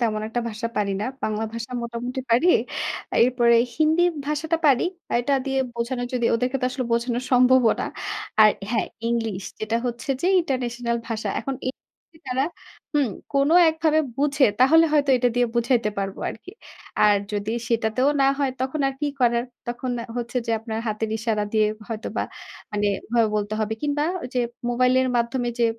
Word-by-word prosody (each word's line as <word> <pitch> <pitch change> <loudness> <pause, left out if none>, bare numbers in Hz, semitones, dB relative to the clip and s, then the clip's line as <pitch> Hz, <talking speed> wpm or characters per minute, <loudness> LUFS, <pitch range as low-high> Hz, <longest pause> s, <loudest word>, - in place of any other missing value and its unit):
তেমন 215 -3 0
একটা 240 +2 -2
ভাষা 230 +1 -4
পারি 200 -1 +1
না। - - -1 0.2
বাংলা 215 0 -1
ভাষা 230 +1 -6
মোটামুটি 240 +2 -4
পারি 245 +10 +4 0.8
এরপরে 240 -1 +4 0.2
হিন্দি 315 +2 +3 0.2
ভাষাটা 305 +2 0
পারি। 270 -4 +5 0.4
এটা 245 +4 0
দিয়ে 270 0 0 0.2
বোঝানো 240 +2 -2
যদি 240 -2 +1
ওদেরকে 250 +3 0
তো - - 0
আসলে 255 0 -3
বোঝানো 235 +1 0
সম্ভবও 250 -2 +5
না। - - -1 0.5
আর 215 0 +9 0.2
হ্যাঁ 230 -2 +1 0.2
ইংলিশ 225 -5 -1 0.2
যেটা 215 +1 0
হচ্ছে 240 +3 -4
যে 345 - 0
ইন্টারন্যাশনাল 245 -5 -2
ভাষা। 220 -2 -3
এখন 270 - -3
এ - - +1 0.6
তারা 255 +2 +1 0.5
হুম 285 -4 +3 0.3
কোনো 280 +3 +3 0.2
একভাবে 315 -1 +2 0.2
বুঝে 280 0 +3 0.2
তাহলে 320 +6 +7
হয়তো 290 -2 +3
এটা 245 0 +2
দিয়ে 245 0 +3
বুঝাইতে 235 -2 +2
পারবো 195 -1 -3
আরকি। 230 - -11 0.5
আর 210 -1 +6 0.2
যদি 205 +1 -2 0.2
সেটাতেও 230 +3 +1
না 270 - +5
হয় 275 -2 +1
তখন 265 +4 -1
আর 270 - -5
কি 295 - 0
করার। 235 -1 +3 0.2
তখন 240 +1 -3
আ - - -7
হচ্ছে 240 +1 -4
যে - - -1
আপনার 220 -1 -4
হাতের 215 +1 -2
ইশারা 220 -1 -1
দিয়ে 215 -1 +3 0.2
হয়তোবা 225 0 -3 0.5
মানে 205 0 0 0.2
ওভাবে 230 -1 +2
বলতে 210 +1 -2
হবে 215 +1 -1
কিংবা 295 0 0 0.2
ওইযে 250 0 -2 0.3
মোবাইলের 255 +1 +3
মাধ্যমে 240 +1 0
যে 235 - +3
240 Hz, 170 wpm, -24 LUFS, 225-265 Hz, 0.8 s, আর